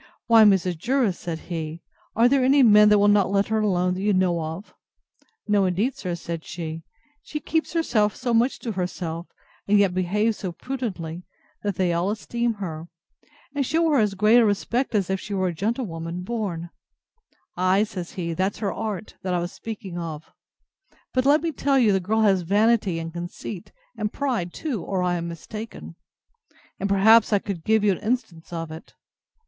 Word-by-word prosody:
Why, 225 -2 +7
Mrs. 185 -4 +3
Jervis, 245 -4 +1
said 170 -2 -4
he, 165 -1 -5 0.3
are 230 +2 +5
there 265 0 +3
any 270 +2 +5
men 210 -2 +7
that 210 - +6
will 205 0 +4
not 205 -2 +4
let 200 +1 +1
her 220 0 +1
alone, 180 -4 +1
that 185 - -4
you 205 +1 +2
know 180 -3 +2
of? 160 +6 -6 0.7
No, 205 -2 +3
indeed, 200 +9 0
sir, 180 -2 -4
said 170 -1 -6
she; 160 -2 -6 0.4
she 300 - -5
keeps 320 +2 -1
herself 215 - +1
so 245 -2 -2
much 235 +3 +2
to 230 - -3
herself, 180 -3 -4 0.4
and 205 +1 +4
yet 200 -3 +3
behaves 210 +5 0
so 185 -3 -4
prudently, 185 -9 -5 0.4
that 205 -2 -2
they 180 -2 +1
all 170 +3 0
esteem 235 +2 -2
her, 165 -5 -6 0.7
and 285 -1 0
shew 325 +4 +1
her 285 - +4
as 210 -2 +1
great 215 +5 +5
a - - +5
respect 230 +4 0
as 195 -3 +1
if 190 - 0
she 205 +1 -5
was 185 -2 0
a - - -8
gentlewoman 180 -4 -3
born. 185 -6 -4 0.8
Ay, 185 +3 +3
says 185 -5 -6
he, 170 -2 -3
that's 190 +4 -1
her 205 -3 -2
art, 215 -2 -5
that 185 -2 -1
I - - +1
was 175 +1 -3
speaking 200 -6 -7
of: 160 -2 -7 0.8
but, 255 +1 +2
let 300 +3 +4
me 335 - 0
tell 275 -1 +1
you, 235 -5 +4
the 190 - +2
girl 215 +5 0
has 195 -4 +4
vanity 205 0 +2
and 165 0 -5
conceit, 175 +2 -7 0.2
and 210 -1 -2
pride 240 -11 -2
too, 260 - -4
or 185 0 -2
I 175 -1 +1
am 170 0 -4
mistaken; 215 +7 -8 0.8
and, 200 - -1
perhaps, 215 +4 +5
I 205 - +5
could 195 -4 -5
give 220 +2 +2
you 205 - +4
an 185 - -2
instance 210 -9 -3
of 165 -2 -5
it. 160 +1 -11
200 Hz, 190 wpm, -24 LUFS, 175-225 Hz, 0.8 s, Why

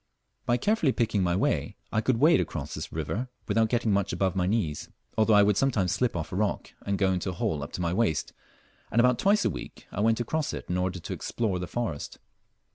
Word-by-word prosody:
By 120 - +3
carefully 165 - +2
picking 110 -4 +1
my 85 -1 +1
way - - 0 0.2
I 110 - +1
could 120 +1 +1
wade 155 +7 +5
across 75 -2 -4
this 80 +1 -5
river 90 - -3 0.2
without 110 +1 +2
getting 115 -2 +1
much 100 -1 +1
above 95 -2 0
my 90 -1 +1
knees, 95 -8 -1 0.3
although 110 0 +4
I 105 - +7
would 100 -1 +3
sometimes 105 -10 +2
slip 125 -5 0
off 80 -3 -4
a - - -4
rock 105 +1 -1
and 100 -1 -1
go 95 -1 +2
into 90 +1 -2
a - - -3
hole 80 -3 -1
up 70 - -6
to - - -3
my 85 0 0
waist, 90 -9 0 0.6
and 115 - +1
about 125 0 +4
twice 200 +1 +3
a - - +4
week - - -8
I - - -5
went 115 +2 +3
across 150 +6 -1
it - - -5
in 90 - +1
order 90 0 -1
to - - -5
explore 105 -6 -2
the 90 - -4
forest. 115 -12 -4
100 Hz, 230 wpm, -28 LUFS, 90-120 Hz, 0.6 s, I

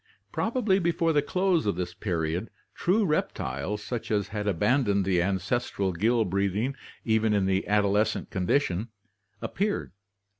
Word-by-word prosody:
Probably 220 -4 +1
before 170 -1 +1
the 145 - +4
close 180 - +1
of 100 - +1
this 90 0 -3
period 85 +1 -2 0.2
true 205 +4 +2
rep 155 -3 0
tiles, 95 +11 -4
such 120 0 -4
as 105 -2 0
had 105 -1 -3
abandoned 105 +1 +2
the 90 -2 +2
ancestral 100 +2 -1
gill 110 +6 +2
breathing 100 +6 0 0.3
even 110 -1 +2
in 100 -2 +2
the 95 0 0
adolescent 105 +1 +1
condition, 95 +1 0 0.6
appeared. 205 - -1
105 Hz, 140 wpm, -27 LUFS, 95-140 Hz, 0.6 s, the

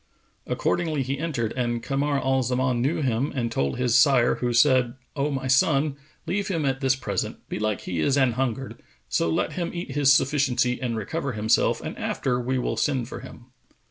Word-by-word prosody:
Accordingly 160 -5 0
he 135 +2 -3
entered 135 -9 -2
and 120 -2 -1
Kamar 140 +1 0
al 135 0 +1
Zaman 125 0 0
knew 145 +4 0
him 130 +2 0
and 120 -3 -1
told 70 -10 -1
his 125 -2 +1
sire 130 -2 +5
who 120 -1 -1
said, 125 -1 +3 0.2
"O 145 0 0
my 135 -2 -3
son, 140 +2 +3 0.3
leave 200 +2 -1
him 165 -6 -1
at 135 +1 -1
this 135 -1 +3
present: 130 - -3
belike 105 -1 -2
he 85 - -4
is 135 - +2
anhungered: 130 0 0 0.3
so 85 - +1
let 80 - 0
him 175 -2 -2
eat 170 -5 -5
his 140 0 +4
sufficiency 130 -3 +2
and 120 -3 -2
recover 140 +5 -3
himself 110 +1 +2
and - - -5
after 125 -2 -1
we 130 +2 -1
will 125 - -2
send 130 -5 0
for - - -6
him." 125 0 -13
130 Hz, 185 wpm, -25 LUFS, 120-140 Hz, 0.3 s, sire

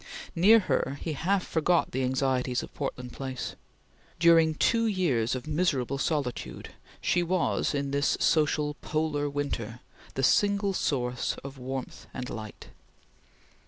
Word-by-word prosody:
Near 210 +6 +6
her 140 -6 -1
he 160 - -3
half 180 +6 0
forgot 170 +2 +1
the 130 - -1
anxieties 130 -1 0
of - - -10
Portland 125 -3 -5
Place. 130 -2 -5 0.6
During 165 -2 +5
two 230 +7 +2
years 140 - +1
of 125 - -5
miserable 150 -5 0
solitude, 140 -5 -2 0.3
she 175 - +2
was 175 -3 0
in 140 -1 -1
this 140 +1 +1
social 150 -1 +2
polar 155 -2 -1
winter, 125 -5 -4 0.3
the 135 - -1
single 200 +4 +3
source 125 -7 -1
of 135 0 -8
warmth 130 0 -6
and 125 0 -5
light. 110 -2 -8
145 Hz, 130 wpm, -28 LUFS, 130-170 Hz, 0.6 s, Near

